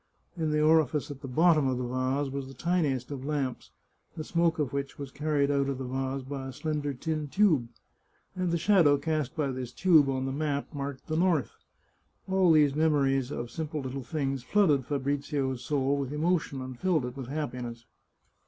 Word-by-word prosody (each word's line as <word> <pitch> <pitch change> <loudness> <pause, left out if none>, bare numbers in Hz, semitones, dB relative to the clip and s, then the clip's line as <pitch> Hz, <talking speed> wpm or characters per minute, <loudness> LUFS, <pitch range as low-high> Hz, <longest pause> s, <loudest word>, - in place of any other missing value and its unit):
In 160 -3 -1
the 150 0 +1
orifice 155 -2 +3
at 140 -1 -9
the 135 - -6
bottom 155 +2 +4
of 130 -1 0
the 125 - -2
vase 130 +3 -1
was 135 -1 -4
the 135 - -11
tiniest 145 -6 0
of 135 -2 -5
lamps, 140 -3 -2 0.5
the 155 - -3
smoke 170 +1 +1
of 145 -5 -1
which 140 0 -3
was 140 -2 -7
carried 145 0 0
out 140 -1 +1
of 135 - -2
the 135 - -5
vase 135 +1 -3
by 135 0 -5
a - - -5
slender 150 0 -2
tin 155 +3 -3
tube, 150 - +3 0.7
and 180 -1 -1
the 170 - +1
shadow 165 -5 +4
cast 150 -2 -2
by 145 -4 0
this 130 -2 -5
tube 155 -2 +4
on 130 -1 -1
the 135 - -2
map 145 +1 -2
marked 140 -2 -5
the 155 - -2
north. 165 - +2 0.8
All 190 -2 +4
these 150 -3 +5
memories 140 -4 +2
of 120 -4 -5
simple 155 -2 -4
little 135 +1 -4
things 135 -2 -2
flooded 150 -3 +2
Fabrizio's 140 -2 -1
soul 140 +1 +1
with 140 -1 -3
emotion 150 -3 0
and 130 -2 -8
filled 170 -8 +1
it 125 0 -6
with 135 -3 -6
happiness. 125 -5 -5
140 Hz, 190 wpm, -29 LUFS, 130-155 Hz, 0.8 s, these